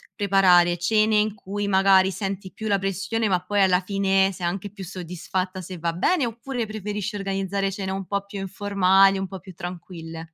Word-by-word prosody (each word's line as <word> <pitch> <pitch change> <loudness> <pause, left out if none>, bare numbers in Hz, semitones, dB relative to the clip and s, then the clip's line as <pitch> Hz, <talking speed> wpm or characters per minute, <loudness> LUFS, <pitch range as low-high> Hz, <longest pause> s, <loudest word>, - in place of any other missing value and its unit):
preparare 180 -4 +4
cene 215 +4 +2
in 210 0 +1
cui, 205 0 -4
magari, 190 -1 +5
senti 195 0 -4
più 220 0 -5
la 200 -1 +2
pressione, 195 +4 -1
ma 180 -3 +1
poi, 205 +2 -1
alla 185 -1 +4
fine, 195 0 +2
sei 180 -2 -4
anche 195 +3 -3
più 195 -2 -8
soddisfatta, 185 +1 -4
se 185 +1 -8
va 170 0 -1
bene? 265 - +1
Oppure, 235 +1 -4
preferisci 210 0 -4
organizzare 195 0 -2
cene 195 0 -4
un 195 0 -4
po' 200 +1 -2
più 200 0 -7
informali, 195 0 +3
un 190 0 -3
po' 190 0 -8
più 185 0 -12
tranquille? 170 -2 -8
195 Hz, 185 wpm, -24 LUFS, 185-205 Hz, -, magari